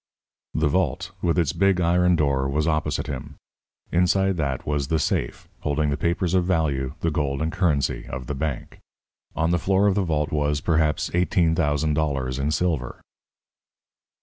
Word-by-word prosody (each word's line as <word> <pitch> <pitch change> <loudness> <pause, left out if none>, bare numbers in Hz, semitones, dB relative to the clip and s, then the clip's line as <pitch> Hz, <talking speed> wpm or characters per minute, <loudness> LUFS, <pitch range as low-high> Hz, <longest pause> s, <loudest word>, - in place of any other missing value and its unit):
The 80 -1 +2
vault, 75 -2 0
with 85 0 +1
its 80 -5 +1
big 95 -2 +2
iron 90 +1 +3
door, 70 -4 +1
was 75 +3 0
opposite 75 -1 0
him. 75 0 -6 0.6
Inside 95 +2 +2
that 70 -4 -2
was 70 -2 -1
the 80 - +1
safe, 65 -5 -2
holding 75 0 0
the - - +1
papers 85 +3 -1
of 90 -1 +3
value, 75 -7 0
the 85 - +1
gold 70 -2 -1
and 80 +2 -1
currency 75 -7 0
of 65 -1 -6
the 75 - -4
bank. 70 -1 -4 0.6
On 80 +1 +1
the 85 - +2
floor 95 +4 +2
of 100 - +4
the 100 - +1
vault 75 -4 -1
was, 75 -1 0
perhaps, 80 -1 +1
eighteen 90 -1 +2
thousand 75 -2 +1
dollars 70 -4 -1
in 70 +2 0
silver. 75 -6 -1
75 Hz, 170 wpm, -24 LUFS, 70-85 Hz, 0.6 s, of